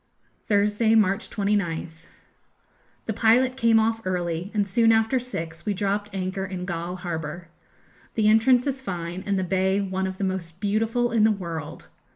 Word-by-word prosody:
Thursday, 210 +2 +3
March 200 -3 +2
29th. 175 -6 -2 1.0
The 220 - -2
pilot 240 +4 +3
came 230 -3 +4
off 225 +1 +1
early, 175 -1 -2
and 205 -2 0
soon 225 +3 +4
after 225 +3 +3
six 165 -10 -6
we 205 -2 -1
dropped 205 +1 -1
anchor 190 0 -3
in 185 -2 -5
Galle 175 0 -4
harbour. 170 -2 -5 0.7
The 215 -2 +2
entrance 235 +3 +5
is 270 -2 -2
fine, 175 -5 -5
and 200 -1 +1
the 190 - 0
bay 190 +1 +1
one 190 -1 -2
of 190 0 -6
the 200 - -3
most 180 -3 -3
beautiful 225 +4 0
in 225 -2 +3
the 220 - +6
world. 170 -7 -5
200 Hz, 165 wpm, -25 LUFS, 180-220 Hz, 1.0 s, the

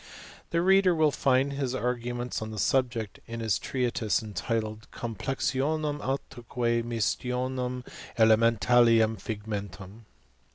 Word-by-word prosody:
The 170 0 +1
reader 190 -1 +5
will 155 -2 +3
find 135 0 +2
his 135 -2 -2
arguments 120 -1 -2
on 110 - -4
the 110 - -7
Subject, 120 -2 0
in 115 0 -6
his 110 -4 0
treatise 120 -4 -1
entitled 110 +2 -3
" - - -35
Complexionum 135 +6 -2
atquef 120 -3 -2
Mistionum 125 +2 -2 0.3
elementalium 115 -1 +4
Figmentum." 105 -1 -6
120 Hz, 110 wpm, -28 LUFS, 110-130 Hz, 0.3 s, reader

